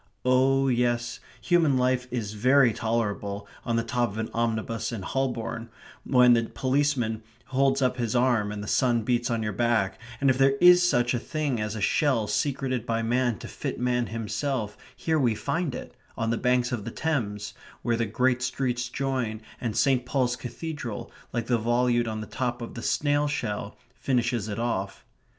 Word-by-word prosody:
Oh 135 Hz, +1 st, +4 dB
yes, 120 Hz, -1 st, 0 dB, 0.2 s
human 165 Hz, -6 st, +3 dB
life 125 Hz, 0 st, +1 dB
is 115 Hz, -4 st, -3 dB
very 125 Hz, +2 st, +4 dB
tolerable 105 Hz, -3 st, -2 dB, 0.2 s
on 115 Hz, -, -1 dB
the 115 Hz, -, +1 dB
top 120 Hz, +1 st, 0 dB
of 100 Hz, -, -8 dB
an 110 Hz, 0 st, -3 dB
omnibus 115 Hz, 0 st, -1 dB
in 110 Hz, -5 st, -5 dB
Holborn, 120 Hz, -1 st, -2 dB, 0.3 s
when 125 Hz, -2 st, +5 dB
the 115 Hz, -1 st, +2 dB
policeman 130 Hz, -5 st, 0 dB, 0.2 s
holds 135 Hz, +1 st, +2 dB
up 125 Hz, 0 st, +1 dB
his 120 Hz, -1 st, -1 dB
arm 120 Hz, -4 st, +2 dB
and 105 Hz, -1 st, -5 dB
the -, -, -7 dB
sun 120 Hz, -2 st, +2 dB
beats 120 Hz, +1 st, 0 dB
on 115 Hz, -2 st, 0 dB
your 105 Hz, -1 st, -2 dB
back, 115 Hz, -4 st, +1 dB, 0.2 s
and 135 Hz, -1 st, +4 dB
if 130 Hz, -, -1 dB
there 135 Hz, 0 st, +5 dB
is 180 Hz, 0 st, +8 dB
such 120 Hz, -9 st, +2 dB
a 120 Hz, -, 0 dB
thing 145 Hz, -3 st, -2 dB
as 105 Hz, +1 st, -3 dB
a 105 Hz, -, -4 dB
shell 125 Hz, +1 st, +2 dB
secreted 130 Hz, 0 st, -1 dB
by 115 Hz, -1 st, -1 dB
man 120 Hz, 0 st, +1 dB
to -, -, -9 dB
fit -, -, -5 dB
man 125 Hz, -1 st, +1 dB
himself 115 Hz, +1 st, -3 dB, 0.2 s
here 160 Hz, -1 st, +1 dB
we 120 Hz, -5 st, +2 dB
find 145 Hz, +4 st, -2 dB
it, -, -, -8 dB, 0.2 s
on 115 Hz, 0 st, 0 dB
the -, -, +1 dB
banks 125 Hz, 0 st, +2 dB
of 120 Hz, -5 st, -2 dB
the 115 Hz, -, -5 dB
Thames, 110 Hz, -9 st, -2 dB, 0.3 s
where 120 Hz, -, +1 dB
the 115 Hz, -1 st, -1 dB
great 125 Hz, +4 st, +1 dB
streets 125 Hz, -1 st, -1 dB
join 130 Hz, -5 st, -2 dB, 0.2 s
and 115 Hz, -4 st, -2 dB
St. 135 Hz, -3 st, +3 dB
Paul's 125 Hz, -1 st, 0 dB
Cathedral, 125 Hz, -1 st, -6 dB, 0.2 s
like 120 Hz, -1 st, -2 dB
the 120 Hz, -1 st, +1 dB
volute 120 Hz, +1 st, +2 dB
on 110 Hz, -1 st, -3 dB
the -, -, -5 dB
top 120 Hz, +1 st, -3 dB
of 115 Hz, -, -7 dB
the 115 Hz, -, -6 dB
snail 145 Hz, +3 st, +1 dB
shell, 105 Hz, -7 st, -3 dB, 0.2 s
finishes 120 Hz, -5 st, 0 dB
it 100 Hz, -, -4 dB
off. 100 Hz, -5 st, -3 dB
120 Hz, 185 wpm, -27 LUFS, 115-130 Hz, 0.3 s, is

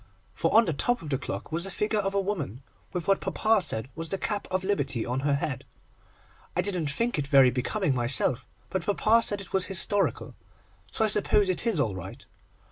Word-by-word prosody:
for -, -, 0 dB
on 225 Hz, +1 st, +6 dB
the 165 Hz, -, -1 dB
top 245 Hz, -, 0 dB
of 150 Hz, -, -7 dB
the 135 Hz, -, +1 dB
clock -, -, -5 dB
was 170 Hz, +4 st, -1 dB
a -, -, -5 dB
figure 210 Hz, +2 st, -1 dB
of 195 Hz, -1 st, -2 dB
a -, -, +3 dB
woman, 155 Hz, -, -3 dB, 0.3 s
with 175 Hz, -2 st, -4 dB
what 195 Hz, -1 st, +3 dB
papa 220 Hz, -1 st, +2 dB
said 120 Hz, -9 st, -2 dB
was 165 Hz, 0 st, -4 dB
the 195 Hz, -, -1 dB
cap 205 Hz, +1 st, -2 dB
of 185 Hz, 0 st, -1 dB
Liberty 140 Hz, -, -1 dB
on 125 Hz, +2 st, -2 dB
her 140 Hz, +1 st, +1 dB
head. 140 Hz, -2 st, -3 dB, 0.9 s
I 180 Hz, -, +2 dB
didn't 180 Hz, -5 st, -1 dB
think 230 Hz, +5 st, 0 dB
it 140 Hz, -, -2 dB
very 135 Hz, -3 st, +6 dB
becoming 140 Hz, -, 0 dB
myself, 125 Hz, +1 st, 0 dB, 0.2 s
but 190 Hz, -2 st, -1 dB
papa 215 Hz, +3 st, +4 dB
said 205 Hz, -3 st, 0 dB
it 195 Hz, -, -11 dB
was 190 Hz, -1 st, +2 dB
historical, 195 Hz, +1 st, +1 dB, 0.6 s
so 220 Hz, -, +1 dB
I -, -, +3 dB
suppose 205 Hz, -1 st, +2 dB
it 185 Hz, +5 st, 0 dB
is 220 Hz, -9 st, +1 dB
all 115 Hz, -8 st, +1 dB
right. 95 Hz, -2 st, -9 dB
185 Hz, 210 wpm, -27 LUFS, 140-205 Hz, 0.9 s, on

